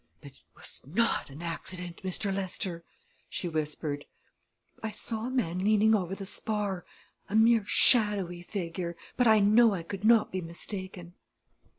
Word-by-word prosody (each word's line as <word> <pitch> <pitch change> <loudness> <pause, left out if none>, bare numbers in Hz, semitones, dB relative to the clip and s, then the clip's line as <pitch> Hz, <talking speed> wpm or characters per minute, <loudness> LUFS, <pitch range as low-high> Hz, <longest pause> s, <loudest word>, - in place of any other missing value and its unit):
"But - - -12
it - - -22 0.2
was - - -9
not 215 +5 0
an 145 +5 -10
accident, 175 +1 -4
Mr. 195 +1 -1
Lester!" 185 -2 -3 0.5
she 180 - -3
whispered. 150 -2 -2 0.8
"I 220 - -3
saw 220 +1 -4
a - - -3
man 200 -10 -1
leaning 215 +2 +4
over 190 -3 0
the 195 - -7
spar 205 -2 -3 0.4
a 205 - -3
mere 225 0 +5
shadowy 205 -9 +4
figure 170 -2 -5 0.2
but 250 -1 +3
I 220 -1 +6
know 215 +1 +5
I 170 - -5
could 195 +3 -7
not 225 0 +5
be 185 - -2
mistaken." 180 +1 -6
190 Hz, 155 wpm, -29 LUFS, 175-215 Hz, 0.8 s, I